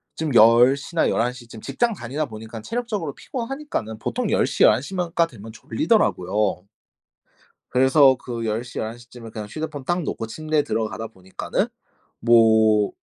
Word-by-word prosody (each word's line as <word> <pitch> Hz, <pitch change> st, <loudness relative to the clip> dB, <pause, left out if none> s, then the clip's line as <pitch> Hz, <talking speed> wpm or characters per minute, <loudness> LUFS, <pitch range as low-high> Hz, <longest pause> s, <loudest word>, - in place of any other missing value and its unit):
좀 155 Hz, -2 st, -2 dB
10 120 Hz, +4 st, +7 dB
시나 145 Hz, +4 st, 0 dB
11 120 Hz, +2 st, 0 dB
시쯤 120 Hz, -3 st, -12 dB
직장 235 Hz, -2 st, 0 dB
다니다 145 Hz, -, -3 dB
보니깐 110 Hz, -2 st, -9 dB
체력적으로 210 Hz, -, -4 dB
피곤하니까는 250 Hz, -, -5 dB
보통 110 Hz, -, -2 dB
10 -, -, +2 dB
시, -, -, +1 dB
11 110 Hz, +4 st, +5 dB
시만 180 Hz, 0 st, -3 dB
가 170 Hz, -, +4 dB
되면 115 Hz, -8 st, -11 dB
졸리더라고요. 105 Hz, -, 0 dB, 1.1 s
그래서 130 Hz, +1 st, +5 dB
그 120 Hz, -2 st, -6 dB
10 110 Hz, +2 st, -1 dB
시, 120 Hz, -, -7 dB
11 110 Hz, +2 st, -4 dB
시쯤에 120 Hz, -1 st, -12 dB
그냥 105 Hz, -1 st, -7 dB
휴대폰 155 Hz, 0 st, -5 dB
딱 175 Hz, +1 st, 0 dB
놓고 115 Hz, -6 st, -4 dB
침대에 155 Hz, +4 st, -1 dB
들어가다 110 Hz, -1 st, -3 dB
보니까는 95 Hz, -3 st, -3 dB, 0.5 s
뭐 110 Hz, -3 st, +4 dB
120 Hz, 305 characters per minute, -23 LUFS, 110-155 Hz, 1.1 s, 10